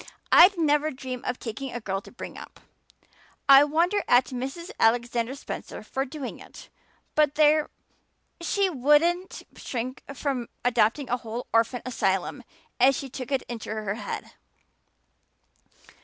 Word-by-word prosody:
"I'd 365 +2 +8
never 300 -1 +2
dream 255 -3 -6
of 250 - -2
taking 255 +3 -6
a 240 - -4
girl 195 -3 -3
to - - -14
bring - - -8
up. - - -11 0.9
I 275 +1 +9
wonder 335 +7 +1
at 245 +1 +5
Mrs. 270 +7 -5
Alexander 235 +2 +1
Spencer 280 - -7
for 270 +1 -3
doing 275 -1 -7
it. - - -13 0.4
But 300 -2 +2
there, 305 0 +4 0.7
she 395 +3 +1
wouldn't 335 +5 +2
shrink 255 +1 -5
from 260 -3 -2 0.2
adopting 245 +3 +2
a 245 - 0
whole 235 +1 -6
orphan 230 +2 +2
asylum 195 +1 -1 0.4
if 265 +2 +5
she 275 +1 -5
took 255 0 -7
it 270 - 0
into 235 -2 -7
her 215 -2 -2
head." 220 - -6
260 Hz, 140 wpm, -26 LUFS, 240-295 Hz, 0.9 s, I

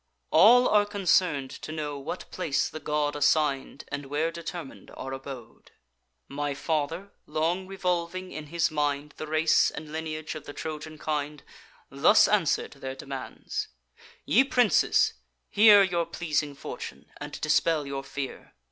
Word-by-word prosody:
"All 245 +1 +7
are 205 -1 +4
concern'd 180 -8 +1
to - - -8
know 150 -2 -4
what 145 +6 -6
place 165 -6 0
the 155 - -7
god 150 -1 -1
Assign'd, 145 -2 +1
and 140 -1 -5
where 155 +4 0
determin'd 170 -3 -8
our 135 +1 -5
abode. 135 -3 -10 0.5
My 145 0 -3
father, 165 +6 -2 0.2
long 165 +5 -1
revolving 185 -1 -2
in 155 -1 -7
his 170 +1 0
mind 145 -1 -1
The 155 - -5
race 155 +1 +3
and 150 -1 -8
lineage 155 0 -4
of 155 -2 -8
the 145 - -8
Trojan 155 0 -6
kind, 150 -1 -3 0.5
Thus 140 +10 +5
answer'd 195 -8 +1
their 135 -1 -7
demands: 135 0 -5 0.6
'Ye 260 - +5
princes, 250 -5 +3 0.4
hear 205 -1 +8
Your 170 -3 0
pleasing 150 -4 -2
fortune, - - -8
and - - -7
dispel 155 0 +2
your 140 0 -4
fear. 135 -1 -7
155 Hz, 140 wpm, -27 LUFS, 145-175 Hz, 0.6 s, hear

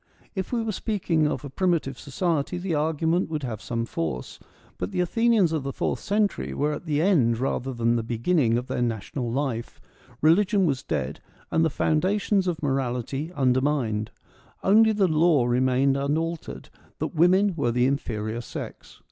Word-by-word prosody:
If 190 -3 -4
we 235 -2 0
were 225 - -1
speaking 180 -7 0
of 150 - -3
a - - -6
primi 180 +2 +2
tive 135 -3 -8
society 160 +2 -1
the 180 -1 -3
argument 160 +3 +1
would 155 -3 -3
have 110 -4 -4
some 115 -1 -2
force, 80 - -4 0.4
but 90 - -2
the - - -3
Athenians 215 0 +3
of 160 -2 0
the 135 +1 -4
fourth - - -2
century 200 - -1
were 150 - 0
at 155 - -7
the 150 0 +1
end 135 - +3
rather 130 +1 -2
than 120 -1 +1
the - - 0
beginning 120 +2 +1
of 125 - -3
their 125 - -3
national 120 +1 -2
life: 125 -3 -3 0.4
religion 195 +5 +4
was 135 -6 0
dead, - - -3 0.3
and 160 - +3
the 160 - +3
foundations 190 +6 +1
of 165 -3 -2
morality 135 +2 -2
undermined; 130 -5 +1 0.5
only 220 +3 +5
the 205 -3 +2
law 155 -5 +3
remained 130 +2 +2
un 140 +2 0
altered, 165 0 -5 0.3
that - - -3
women 185 +4 +4
were 140 -7 0
the 125 +1 +2
inferior 115 -4 -2
sex. - - -9
145 Hz, 175 wpm, -25 LUFS, 125-175 Hz, 0.5 s, only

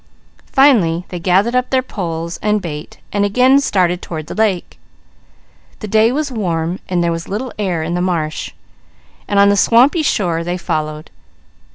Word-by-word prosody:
Finally 195 - +3
they 180 - -5
gathered 195 +7 +2
up 250 0 +1
their 260 -1 +1
poles 170 -7 -5
and 210 0 +1
bait 155 -4 -7 0.2
and 205 0 +1
again 250 +7 +4
started 180 -9 +1
toward 155 -2 -6
the - - -7
lake. 210 -5 -1 1.0
The 215 - -7
day 220 +3 +3
was 290 +1 -2
warm, 175 -5 -2
and 175 -2 +1
there 170 - +1
was 165 0 -4
little 225 +6 -4
air 180 -6 -1
in 165 +2 -3
the 175 - -1
marsh, 165 -4 -2 0.8
and 200 - -1
on 200 0 +6
the 200 - +3
swampy 250 - +4
shore 175 - 0
they 175 +1 -3
followed. 155 -3 -4
185 Hz, 170 wpm, -17 LUFS, 170-220 Hz, 1.0 s, on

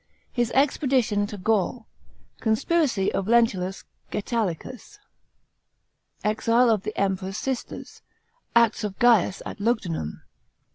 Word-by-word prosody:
His 240 -2 0
expedition 260 -7 +2
to 205 - -7
Gaul. 220 +3 0 0.5
Conspiracy 225 - +1
of 195 - -1
Lentulus 205 -5 +2 0.3
Gsetulicus. 225 - -3 1.3
Exile 230 +3 +3
of 215 -3 +1
the 215 +2 -6
Emperor's 190 0 -1
sisters. 260 +2 -5 0.5
Acts 235 -2 +4
of 200 -2 -4
Gaius 225 -6 +3
at - - -7
Lugudunum. 185 - -2
220 Hz, 100 wpm, -25 LUFS, 195-240 Hz, 1.3 s, Acts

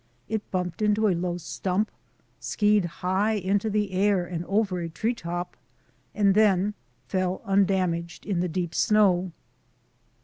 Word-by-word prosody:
It 220 -1 -3
bumped 180 +1 -3
into 210 +1 +3
a 195 - +3
low 175 0 -2
stump, 190 +4 -2 0.5
skied 210 -2 +2 0.2
high 195 +4 +2
into 200 +1 0
the 210 -1 0
air 190 -1 +2
and 170 -1 -4
over 195 -1 0
a 170 -1 -4
tree 220 +9 -1
top, 175 -4 -5 0.6
and 200 -2 +4
then 205 -1 +3 0.3
fell 185 +3 -1
undamaged 185 -4 0
in 195 -4 -1
the 180 0 0
deep 175 0 -3
snow. 190 -3 +3
190 Hz, 140 wpm, -26 LUFS, 180-210 Hz, 0.6 s, and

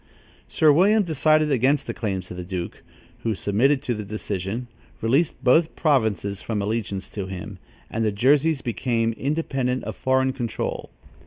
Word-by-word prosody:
Sir 155 -2 +4
William 205 +7 +4
decided 155 -2 +2
against 135 +2 +2
the - - -4
claims 95 -5 -3
of 90 - -7
the 90 - -5
duke, 90 -1 -5 0.4
who 115 -2 -1
submitted 130 +9 +2
to 125 - -1
the 105 -2 -4
decision, 105 +2 -4 0.3
released 135 +4 +1
both 155 +6 +4
provinces 110 - +1
from 110 -2 -2
allegiance 100 -2 -2
to 100 -3 -4
him, 95 +1 -7 0.3
and 115 - -2
the 110 - +2
Jerseys 140 +7 +2
became 115 -1 0
independent 135 -2 -1
of - - -5
foreign 130 0 +1
control. 120 -4 -4
120 Hz, 155 wpm, -24 LUFS, 105-140 Hz, 0.4 s, Sir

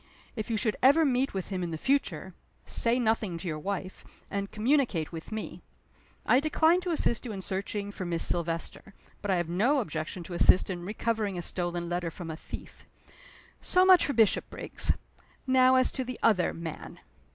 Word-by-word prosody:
If 215 -1 -5
you 225 - 0
should 215 -1 0
ever 285 +5 +6
meet 260 -3 0
with 190 - -3
him 190 -2 -3
in 175 - -2
the 160 - -4
future 190 - -1 0.3
say 235 +1 +1
nothing 220 -7 0
to 165 - -7
your 155 -2 -3
wife, 190 +2 -6
and 200 0 -3
communicate 220 - +1
with 165 +3 -8
me. 220 0 -6 0.6
I 250 - +5
decline 320 +4 +3
to 360 - -4
assist 235 -7 +1
you 240 - -5
in 195 -2 -5
searching 200 +2 -3
for 200 - -6
Miss 170 -2 +1
Silvester; 170 +3 -3 0.3
but 205 - -5
I 190 - +3
have 175 -2 -1
no 225 - +2
objection 160 -4 -4
to 175 - -8
assist 180 +2 +5
in 175 -1 -5
recovering 215 -1 -2
a 175 - -3
stolen 175 -1 -2
letter 175 0 -2
from 165 0 -7
a - - -5
thief. - - -10 0.7
So 365 0 +3
much 370 -2 +7
for 285 - 0
Bishopriggs. 225 -3 +1 0.5
Now 260 0 +5
as 255 0 +4
to 260 - -3
the 255 -1 -6
other 205 -6 +3
man." 165 -2 -8
200 Hz, 185 wpm, -28 LUFS, 175-250 Hz, 0.7 s, much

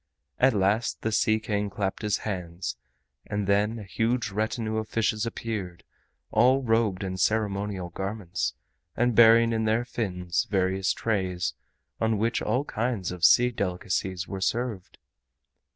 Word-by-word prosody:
At 130 -2 +4
last 100 +4 +1
the 110 - 0
Sea 110 0 +2
King 105 -1 -2
clapped 95 0 -3
his 105 -2 +1
hands, 90 -4 -4 0.5
and 100 0 -2
then 105 +3 +2
a 110 - -7
huge 115 +2 -1
retinue 110 +1 -2
of 110 0 -3
fishes 110 0 0
appeared, 100 -7 -5 0.5
all 130 +5 +4
robed 110 -5 +1
in 95 -1 -3
ceremonial 100 -3 0
garments, 90 - -3 0.4
and 120 0 +2
bearing 115 +1 +6
in 110 0 0
their 110 +2 +1
fins 90 -5 -2
various 95 -1 +1
trays 95 -5 -1 0.5
on 110 -1 +1
which 115 +3 0
all 125 +7 0
kinds 110 -7 -2
of 90 -1 -8
sea 125 +7 +6
delicacies 90 -3 -2
were 95 -1 -5
served. 115 -3 -2
105 Hz, 140 wpm, -27 LUFS, 95-115 Hz, 0.5 s, bearing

